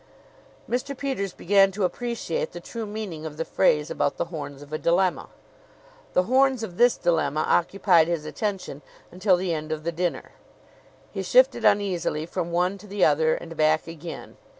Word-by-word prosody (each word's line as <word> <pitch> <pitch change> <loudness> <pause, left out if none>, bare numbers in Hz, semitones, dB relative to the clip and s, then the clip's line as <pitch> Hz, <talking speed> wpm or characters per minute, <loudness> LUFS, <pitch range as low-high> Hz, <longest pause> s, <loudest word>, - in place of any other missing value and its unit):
Mr. 255 +3 -3
Peters 260 -9 -2
began 195 +2 +3
to 200 +1 -3
appreciate 235 -2 -2
the 175 - -6
true 225 +5 -6
meaning 205 -7 -6
of 155 -1 -7
the 165 - -2
phrase 150 -5 +2
about 140 - -1
the - - -1
horns 145 -2 -6
of 145 +1 -13
a 155 - -2
dilemma. 180 +2 +1 0.8
The 180 - +3
horns 260 +2 +2
of 180 -5 -7
this 245 0 +4
dilemma 155 -4 +1
occupied 175 -2 +3
his 170 -3 -2
attention 190 -4 -4 0.3
until 185 +1 +3
the 180 -1 -1
end 155 0 -4
of 155 -1 -3
the 170 - -1
dinner. 175 +1 -3 0.8
He - - -4
shifted - - +4
uneasily 180 -6 +1
from 170 0 -4
one 180 +3 0
to 210 - -13
the 200 -1 +2
other 155 +1 +3
and 165 -1 -8
back 155 0 +2
again. 165 0 -9
175 Hz, 175 wpm, -25 LUFS, 160-205 Hz, 0.8 s, this